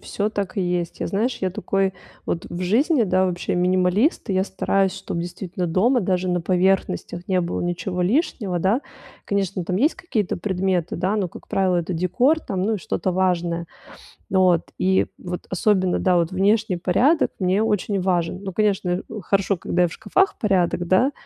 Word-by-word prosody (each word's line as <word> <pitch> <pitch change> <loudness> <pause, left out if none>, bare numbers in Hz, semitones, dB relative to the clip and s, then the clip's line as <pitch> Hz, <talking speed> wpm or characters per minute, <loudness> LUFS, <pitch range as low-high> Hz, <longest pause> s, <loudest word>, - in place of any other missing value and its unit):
всё 205 +1 -2
так 200 -1 -4
и - - +1
есть. 175 -2 -2
Я, - - -1
знаешь, 225 +6 -1
я 185 - 0
такой 195 +1 -1 0.3
вот 165 - -2
в 175 - -5
жизни, 245 - +3
да, 185 -1 +2
вообще 180 -1 -2
минималист, 185 - +2
и 190 - 0
я 190 - +2
стараюсь, 195 0 0
чтоб 190 -2 -5
действительно 175 +1 -4
дома 225 +10 +2
даже 185 -2 0
на 175 -1 +1
поверхностях 185 0 0
не 185 -1 +2
было 170 0 -2
ничего 180 +1 -2
лишнего, 205 - 0
да. 195 +9 +2 0.4
Конечно, 195 -3 -1
там 180 +1 -1
есть 285 - +2
какие-то 215 - -2
предметы, 185 -2 -1
да, 185 +4 0
но, 195 -4 0
как - - -13
правило, 190 -2 +1
это 175 +1 -2
декор, 240 - +2
там, 190 -7 -3
ну, 220 +2 +1
и - - -3
что-то 185 +1 -2
важное. 175 -2 0 0.6
Вот. 185 -3 +2
И 190 +1 +2
вот 180 0 -6
особенно, 185 -1 +1
да, 185 -1 +2
вот 170 +1 +1
внешний 200 0 +2
порядок 245 - +2
мне 190 +2 +2
очень 210 -2 0
важен. 180 0 0
Ну, 190 -2 -5
конечно, 200 -2 +1
э, 180 +1 0 0.2
хорошо, 195 +1 +1
когда 180 +1 0
и 175 - +3
в - - -9
шкафах 385 +1 +1
порядок, 180 -4 +1
да, 245 +10 +3
185 Hz, 185 wpm, -22 LUFS, 180-200 Hz, 0.6 s, жизни